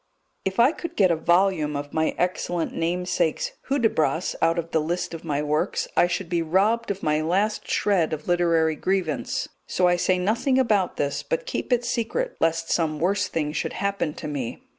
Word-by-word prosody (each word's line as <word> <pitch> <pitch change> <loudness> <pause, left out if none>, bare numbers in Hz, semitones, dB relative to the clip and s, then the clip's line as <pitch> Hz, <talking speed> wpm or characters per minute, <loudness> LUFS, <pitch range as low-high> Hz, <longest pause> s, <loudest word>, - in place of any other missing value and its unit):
If 190 +2 -2
I 245 +5 +6
could 340 0 -7
get 185 -3 +4
a - - +3
volume 170 -2 +2
of 145 0 -5
my 160 0 0
excellent 175 -2 -1
namesake's 170 -1 -1 0.2
Hudibras 215 - +1
out 165 +1 +3
of 165 0 -3
the 160 - +2
list 175 +3 -2
of 165 - -7
my 150 -2 -1
works, 150 +1 0
I 175 - +5
should 175 +1 -3
be 170 -1 0
robbed 200 +8 +1
of 200 -1 -3
my 150 0 +2
last 195 +7 0
shred 185 -6 +2
of 155 -1 -5
literary 165 -3 +2
grievance, 185 -3 -1 0.2
so 180 - +2
I 175 0 +3
say 185 +1 +2
nothing 225 +8 +1
about 210 -8 +2
this, 140 -1 -1
but - - -3
keep - - -4
it 245 -1 +2
secret, 470 - -2
lest 165 0 0
some 155 -3 0
worse 200 +5 +1
thing 150 -2 -2
should - - -2
happen 200 -6 -2
to - - -6
me. 135 -6 -4
175 Hz, 190 wpm, -24 LUFS, 160-200 Hz, 0.2 s, I